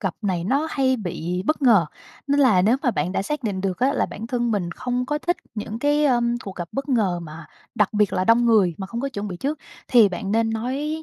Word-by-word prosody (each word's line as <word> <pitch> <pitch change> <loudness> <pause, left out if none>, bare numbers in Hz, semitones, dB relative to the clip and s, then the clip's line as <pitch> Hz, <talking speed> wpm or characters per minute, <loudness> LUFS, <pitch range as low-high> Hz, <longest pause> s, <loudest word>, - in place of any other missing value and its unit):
gặp 190 -4 -2
này 180 -4 -1
nó 275 - +1
hay 260 -1 +1
bị 180 -3 -4
bất 310 -1 0
ngờ, 220 - +5 0.4
nên 285 0 +2
là 215 -10 +5
nếu 225 +6 +4
mà 255 - +2
bạn 185 -5 -2
đã - - 0
xác 300 +7 -3
định 200 -5 -2
được 190 -2 -2
á 265 +2 +2
là - - 0
bản 220 - -7
thân 240 -1 -1
mình 195 -5 -1
không 250 +7 -3
có 295 +2 -1
thích 350 +3 -1 0.2
những 215 0 -5
cái, 290 +3 +2
ơ, 250 -4 +3 0.2
cuộc 195 - -7
gặp 175 -2 -5
bất 275 +1 -4
ngờ 205 -9 +1
mà 160 0 -10 0.3
đặc 210 -3 +1
biệt 210 -2 +2
là 185 - 0
đông 230 +3 +4
người 205 -7 +4
mà 190 - -5
không 235 +5 -5
có 275 - -2
chuẩn 205 -6 -5
bị 180 - -6
trước, 285 - -3 0.3
thì 230 -5 +6
bạn 195 +2 -4
nên 225 0 +2
nói 275 +8 -3
225 Hz, 255 wpm, -23 LUFS, 190-265 Hz, 0.4 s, thì